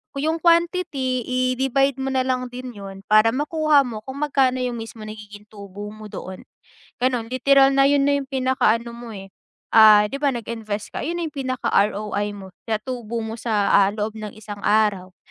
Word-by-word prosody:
Kung 275 - -3
yung 320 +1 0
quantity 335 -7 +1
i-divide 265 +1 +1
mo 265 - -2
na 260 -1 0
lang 255 -1 -1
din 250 0 -8
'yun 195 -2 -10
para 215 +3 +4
makuha 300 -1 +2
mo 230 -4 -6
kung 280 +3 -4
magkano 260 -3 +1
yung 245 -2 -3
mismo 225 -1 -9
nagiging 210 -1 -10
tubo 205 -1 -10
mo 215 0 -10
doon. 190 -2 -8 0.6
Gano'n, 245 -2 -1
literal 275 +1 +4
na 275 0 +4
'yun 285 -1 +3
na 285 - +3
yung 270 - -9
pinakaano 255 -3 0
mo, 235 0 -10
eh, 195 -3 -10 0.4
ah, 215 -2 +8
'di 275 +7 -5
ba 290 - +2
nag-invest 225 -4 -5
ka, - - -4
'yun 335 +4 -3
ang 330 -3 -4
pinaka 260 -4 -3
ROI 205 0 0
mo 190 -1 -11 0.2
na 220 - +1
tubo 235 -1 -5
mo 225 +1 -6
sa, 210 -4 0
ah, 195 -1 +5
loob 215 +1 -4
ng 210 0 -8
isang 205 -1 -9
araw. 205 -4 +1
235 Hz, 190 wpm, -22 LUFS, 210-270 Hz, 0.6 s, ah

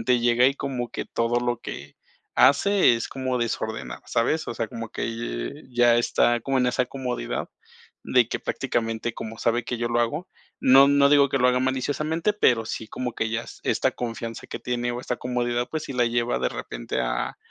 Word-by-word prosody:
últimamente, 125 -1 +2
llega 120 +1 +4
y 140 - -2
como 130 -4 -3
que - - -4
todo 115 +1 0
lo 120 -1 -1
que 70 0 -8 0.4
hace 180 +2 +5
es 115 - -3
como 130 -2 -2
desordenar, 110 - -3
¿sabes?, 155 +7 0
o - - -3
sea, 115 - -2
como 115 +1 -6
que 120 +5 -4
ya 120 -1 +5
está 120 0 +2
como 135 +2 0
en 125 - +2
esa 125 0 +1
comodidad 125 - -4 0.6
de - - +4
que - - -3
prácticamente, 115 0 -2
como 110 0 -7
sabe 120 +1 +1
que 125 - -3
yo 120 - -1
lo 120 0 +1
hago, 150 +9 -2 0.3
no 135 +2 +7
no 140 0 +5
digo 140 -1 +6
que 135 - 0
lo 125 - +4
haga 125 0 +2
maliciosamente, 145 +8 0
pero 120 - +3
sí, 110 - -5
como 125 -1 -4
que 110 - -1
ya 115 +1 -2 0.2
esta - - +1
confianza 115 -1 -5
que - - -5
tiene, 120 0 -2
o 120 - -4
esta 125 - -2
comodidad, 120 -1 -1
pues, 155 -1 -3
sí 135 - -6
la 120 -1 +2
lleva, 120 +1 0
de - - +1
repente, - - -4
a - - -2
120 Hz, 200 wpm, -25 LUFS, 115-130 Hz, 0.6 s, no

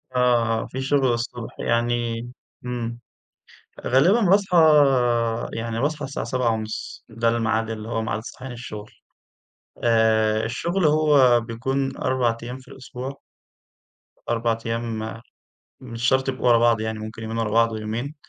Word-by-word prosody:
آه، 120 -2 +2
آه - - -7
في 130 - -6
شغل 135 -2 +2
الصبح، 120 0 -5
يعني 115 0 0 0.4
امم. 120 -1 -4 0.9
غالبًا 170 - +4
باصحى 195 -2 +3 1.0
يعني 115 0 -3
باصحى 150 +1 -1
الساعة 140 +1 -4
7:30، 115 -4 -2
ده 115 +1 -1
الميعاد 115 -1 0
اللي 110 0 -6
هو 115 -1 -1
ميعاد 110 0 -3
صحيان 130 -1 -8
الشغل. 105 -3 -8 0.9
آآ 110 -1 +3
الشغل 170 - -1
هو 145 -5 +5
بيكون 130 +4 -3
4 120 -3 0
أيّام 125 +2 -6
في 130 - -19
الأسبوع 130 +1 -8 1.1
4 115 -1 0
أيّام 115 -1 -4 0.6
مش 115 -2 -8
شرط 130 0 +2
يبقوا 130 -1 0
ورا 120 -1 +6
بعض، 115 -1 +3
يعني 110 0 -3
ممكن 110 +1 -8
يومين 110 +1 -4
ورا 115 -2 -1
بعض 115 +1 +3
ويومين. 110 +7 -4
115 Hz, 135 wpm, -23 LUFS, 115-130 Hz, 1.1 s, ورا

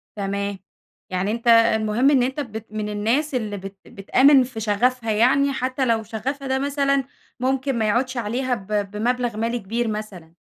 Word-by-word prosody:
تمام 200 -1 -3 0.5
يعني 185 +2 -1
أنتَ 235 +2 -4
المهم 230 +1 +4
إن 265 -4 +4
أنتَ 265 +4 -2
بت 225 -5 -6
من 215 -1 -3
الناس 235 +8 0
اللي 215 -4 -2
بت 195 0 -9
بتآمن 260 +7 +4
في 250 -2 -7
شغفها، 225 +2 0
يعني 270 +6 +3
حتى 260 +1 -1
لو 225 -2 +1
شغفها 265 +6 -4
ده 265 0 0
مثلًا، 275 -1 +1 0.4
ممكن 265 0 0
ما 220 - +1
يعودش 255 +4 0
عليها 245 +3 -1
ب 195 -4 -11 0.2
بمبلغ 240 +1 -1
مالي 230 +2 -1
كبير 230 +4 -2
مثلًا؟ 200 -6 -6
235 Hz, 165 wpm, -22 LUFS, 210-260 Hz, 0.5 s, المهم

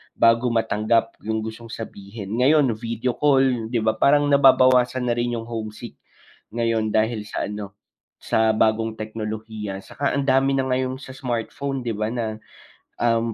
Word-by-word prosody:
bago 115 +1 +4
matanggap 115 0 +1
yung 110 0 -1
gustong 110 +1 -7
sabihin. 105 -1 -7
Ngayon, 140 -1 +4
video 115 +2 -2
call 135 -5 +3
'di 115 -1 -1
ba, 110 0 +1
parang 145 +1 +5
nababawasan 130 -2 +5
na - - +1
rin 120 0 -1
yung 115 - -4
homesick 115 0 -7 0.6
ngayon 115 -2 0
dahil 110 -1 0
sa - - -3
ano, 105 -1 -7 0.5
sa 110 0 +2
bagong 110 +1 +1
teknolohiya. 110 -2 -6
'Tsaka 140 0 -2
ang 140 - 0
dami 135 +1 +3
na 135 - +1
ngayong 130 0 -1
sa 130 - -9
smartphone 130 +2 -3
'di 120 - -2
ba 110 0 -1
na, 110 -3 -3 0.6
um, 115 -1 +1
115 Hz, 155 wpm, -23 LUFS, 110-130 Hz, 0.6 s, parang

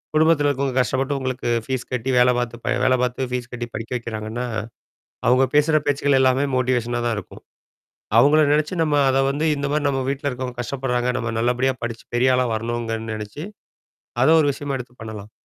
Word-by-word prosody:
குடும்பத்தில 155 -1 +4
இருக்கவங்க 135 -2 -1
கஷ்டப்பட்டு 130 +4 -1
உங்களுக்கு 130 -2 -3 0.2
ஃபீஸ் 130 -2 -3
கட்டி, 125 +1 -2
வேலை 125 0 +5
பாத்து 120 -1 -3
ப - - +1
வேலை 130 0 +4
பாத்து, 125 +1 -2
ஃபீஸ் 125 -1 -3
கட்டி 120 0 -4
படிக்க 115 +2 -6
வைக்கிறாங்கன்னா, 115 +1 -5 0.8
அவுங்க 130 +2 +5
பேசுற 155 +1 +4
பேச்சுக்கள் 140 -1 +2
எல்லாமே 130 +2 +3
மோட்டிவேஷனா 120 -1 0
தான் 115 - 0
இருக்கும். - - -13 0.7
அவுங்கள 145 +6 +6
நெனச்சு 150 +3 +1
நம்ம 150 -2 +1
அத 130 - +2
வந்து 145 +3 -1
இந்த 140 0 -2
மாரி 150 0 0
நம்ம 135 -1 0
வீட்ல 140 +1 -2
இருக்கவங்க 125 -1 -6
கஷ்டப்படுறாங்க, 125 0 -1
நம்ம 115 -1 -3
நல்லபடியா 125 +3 +1
படிச்சு, 115 -1 -5
பெரிய 130 +1 +4
ஆளா 125 0 +2
வரணுங்கன்னு 115 0 -3
நெனைச்சு, 105 +9 -7 0.8
அதை 145 - +5
ஒரு 150 - +2
விஷயமா 140 0 -4
எடுத்து 125 0 -9
பண்ணலாம் 110 -2 -8
125 Hz, 175 wpm, -22 LUFS, 120-140 Hz, 0.8 s, அவுங்கள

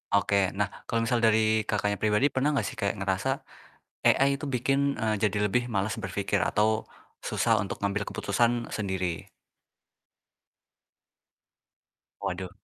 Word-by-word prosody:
Oke, 100 -1 +2
nah, 100 0 0 0.2
kalau 115 0 0
misal 120 +1 +1
dari, 110 -1 +3
Kakaknya, 105 -1 0
pribadi 105 +4 +2
pernah 145 +3 +1
nggak 130 - +1
sih - - -7
kayak 100 -2 0
ngerasa, 95 +5 -1 0.8
AI 140 +1 +4
tuh - - -3
bikin, 140 +3 +1
eee, 110 -1 +1
jadi 105 -1 +2
lebih 125 +3 +2
malas 100 +2 0
berpikir - - -1
atau 110 +1 +1 0.4
susah - - +2
untuk 100 - -4
ngambil 100 +1 0
keputusan 120 +4 0
sendiri? 95 -5 -2 2.9
Waduh. 95 -1 -3
110 Hz, 130 wpm, -28 LUFS, 100-120 Hz, 2.9 s, AI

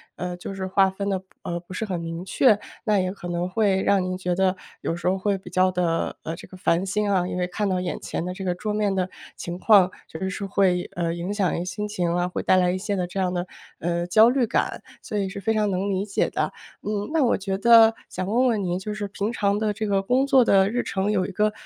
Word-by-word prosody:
呃， 180 0 -4
就 195 - -6
是 190 -1 -4
划 190 0 +3
分 200 +1 -4
得， 190 -1 -1 0.2
呃， 175 0 -3
不 175 +2 -12
是 220 - -3
很 185 -5 -2
明 165 +1 -5
确， 215 +3 +4 0.3
那 210 -3 +3
也 185 0 0
可 190 -3 -8
能 175 +1 -2
会 195 -2 +2
让 200 -1 +3
您 185 0 -2
觉 180 -1 -1
得 190 +1 +2 0.2
有 165 - -2
时 175 - -4
候 190 - +1
会 200 +1 0
比 190 - -12
较 185 0 +3
地， 180 -1 -1 0.4
呃， 160 +1 -4
这 - - -11
个 185 - -13
烦 180 0 +1
心 205 +1 0
啊。 180 -2 +2
因 180 - -4
为 180 - 0
看 205 +3 -2
到 185 -1 0
眼 180 - -3
前 - - -4
的 180 +1 -4
这 190 +1 -6
个 180 -1 0
桌 210 +3 -3
面 210 -2 0
的 185 -1 0 0.3
情 175 +1 -6
况， 195 -4 +5 0.2
确 160 - -8
实 190 - -2
是 200 +1 -4
会， 190 -2 +1
呃， 170 -1 -1
影 175 +4 -3
响 195 -4 +1
一 - - -1
些 175 - -3
心 185 +4 -4
情 175 -4 -1
啊， 175 0 0
会 - - -3
带 185 - +3
来 180 -1 +3
一 185 - -1
些 205 +1 -2
的 180 -2 -1
这 185 +2 -5
样 185 -1 0
的， 175 0 -2 0.3
呃， 170 +1 -1
焦 220 +5 +6
虑 255 0 +2
感。 - - -1 0.2
所 210 - -4
以 195 -1 0
是 200 +1 -7
非 220 +3 +1
常 215 -1 +1
能 195 +1 -1
理 195 +1 -1
解 200 - 0
的。 - - -2 0.3
嗯， 210 +2 -3
那 315 -4 +3
我 235 - +2
觉 195 0 -3
得 225 +1 +7
想 185 - -4
问 235 +7 +2
问 220 -5 +1
您， 180 0 -1
就 210 +2 -5
是 210 -1 -4
平 205 +3 -3
常 200 -1 +1
的 215 -1 0
这 215 +1 -3
个 200 -2 +1
工 250 +7 +2
作 270 -3 +5
的 195 -2 +4
日 245 +3 0
程， 195 +2 -1
有 190 -3 +1
一 195 - -5
个， 210 +3 +1
190 Hz, 295 characters per minute, -24 LUFS, 180-210 Hz, 0.4 s, 得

